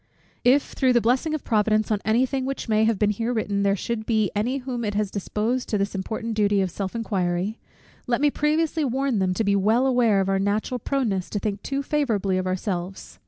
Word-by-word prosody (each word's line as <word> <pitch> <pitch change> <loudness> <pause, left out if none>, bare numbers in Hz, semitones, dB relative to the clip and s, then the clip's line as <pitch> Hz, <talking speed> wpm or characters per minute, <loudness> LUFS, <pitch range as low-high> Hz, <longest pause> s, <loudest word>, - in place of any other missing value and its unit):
If 270 +3 +3
through 260 -2 +2
the 240 - +5
blessing 255 +7 +1
of 305 - -5
Providence 215 -1 +1
on 210 - +1
any 225 +4 +3
thing 265 0 -2
which 270 0 -4
may 220 0 +3
have 225 -2 +2
been 210 0 +2
here 225 +3 -2
written, 205 -4 -1
there 200 0 +2
should 220 +2 -4
be 220 -4 +1
any 240 +6 0
whom 250 -3 -4
it 205 -2 -2
has 210 -2 0
disposed 220 +5 -2
to 210 - +1
this 200 0 -1
important 220 +4 -3
duty 205 -1 +2
of 190 -2 0
self 195 +3 -4
inquiry; 195 -2 -1 0.5
let 240 -1 +1
me 290 0 +3
previously 310 +2 0
warn 265 -3 0
them 185 -1 +1
to 225 - 0
be 200 -1 +2
well 220 +6 +3
aware 245 -6 +3
of 195 - 0
our 195 0 +1
natural 210 +5 -1
proneness 220 -8 -1
to - - -3
think 200 0 -3
too 275 0 -3
favourably 220 -11 0
of 185 - -2
ourselves. 185 - -4
220 Hz, 220 wpm, -24 LUFS, 200-250 Hz, 0.5 s, the